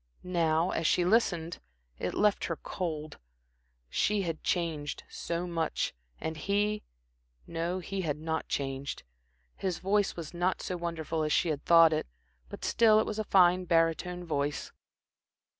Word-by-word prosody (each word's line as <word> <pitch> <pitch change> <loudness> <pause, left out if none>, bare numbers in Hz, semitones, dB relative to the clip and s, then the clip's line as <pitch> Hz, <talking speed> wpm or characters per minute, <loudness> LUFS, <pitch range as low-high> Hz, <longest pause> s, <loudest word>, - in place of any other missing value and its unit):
Now, 170 -1 +1
as 160 - 0
she 175 - +3
listened 175 -5 +1 0.4
it 90 - -2
left 210 -1 +2
her 165 - -2
cold. 155 -4 -5 0.7
She 205 - +1
had 165 -3 -4
changed 160 -5 -1
so 170 +1 -3
much, 165 -2 -1 0.3
and 160 - -3
he 205 +5 0 0.6
no, 170 +2 -2
he 190 +1 -3
had 150 -4 -1
not 160 +1 -3
changed. 135 0 -3 0.5
His 185 -3 -2
voice 200 +1 +1
was 170 -1 -7
not 175 +2 0
so 180 - -3
wonderful 165 -2 -3
as 155 0 0
she 175 - +3
had 145 -2 -2
thought 165 -1 +7
it, 155 - -1 0.4
but - - -7
still 220 -2 +5
it 220 - +1
was 215 0 -4
a - - +1
fine 185 -2 +4
barytone 170 +2 +1
voice. 145 -2 -2
170 Hz, 150 wpm, -30 LUFS, 160-185 Hz, 0.7 s, thought